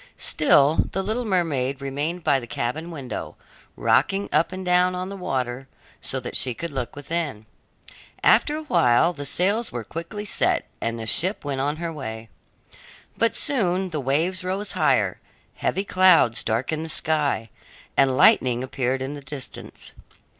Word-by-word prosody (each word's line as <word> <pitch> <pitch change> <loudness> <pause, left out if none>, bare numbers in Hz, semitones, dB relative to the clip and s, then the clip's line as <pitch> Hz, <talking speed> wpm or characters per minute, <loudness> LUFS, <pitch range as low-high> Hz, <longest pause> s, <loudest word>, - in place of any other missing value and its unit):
Still 145 +3 +3
the 195 - -1
little 230 +5 -1
mermaid 145 - 0
remained 145 +6 -3
by 140 - +3
the 120 - -9
cabin 135 +9 -3
window, 140 -7 -6 0.4
rocking 195 +1 +2
up 160 +3 +3
and 185 0 -6
down 180 0 +3
on 185 +1 -4
the 200 - -6
water, 130 -7 -3 0.3
so 130 - -2
that 125 - -6
she 125 -3 +4
could 170 +4 -5
look 130 -4 -4
within. 145 -6 -3 0.8
After 300 - +4
a 315 - -6
while 160 - +3
the 145 -3 -5
sails 200 - +1
were 120 -2 -4
quickly 170 - -6
set, - - +1 0.2
and 115 0 -2
the 110 - -5
ship 175 - +1
went 135 -2 -1
on 145 +2 0
her 165 +1 -4
way. 115 -6 -7 0.9
But 230 - +1
soon 190 -8 0
the 155 - -2
waves 165 +8 0
rose 190 +3 -3
higher, - - +2 0.4
heavy 195 - -1
clouds 185 - +4
darkened 130 +8 -1
the 165 - -6
sky, 150 -8 -1 0.4
and 135 -1 +3
lightning 125 -1 +5
appeared 130 0 -1
in 135 +2 -4
the 145 - -8
distance. 135 -1 -7
150 Hz, 160 wpm, -24 LUFS, 130-180 Hz, 0.9 s, lightning